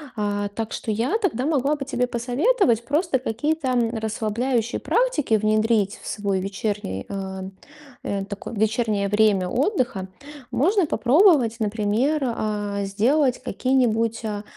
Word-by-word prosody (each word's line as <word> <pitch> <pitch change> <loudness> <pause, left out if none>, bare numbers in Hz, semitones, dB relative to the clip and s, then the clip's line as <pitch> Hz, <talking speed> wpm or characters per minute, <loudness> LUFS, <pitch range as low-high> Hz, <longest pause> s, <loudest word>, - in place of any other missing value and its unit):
А, 205 -1 -1
так 220 +2 -5
что - - -5
я 230 - 0
тогда 265 - 0
могла 290 -1 +1
бы 280 -2 -6
тебе 250 -2 -1
посоветовать 245 - +1
просто 295 +1 +1
какие-то 260 +3 -1 0.2
расслабляющие 225 +2 -1
практики 465 - +1
внедрить 215 -1 +1
в - - -10
свой 200 -2 -1
вечерний, 195 - -3
э, 190 -1 -5 0.6
э, 195 -1 -2
такой 200 +2 -7
вечернее 215 -2 0
время 205 -3 +3
отдыха. 250 - 0 0.4
Можно 360 - +2
попробовать, 255 - +4
например, 220 +8 0
а, 210 -4 -2
сделать 250 +7 +1
какие-нибудь, 230 -3 0
а, 210 -1 -3
225 Hz, 125 wpm, -23 LUFS, 205-265 Hz, 0.6 s, попробовать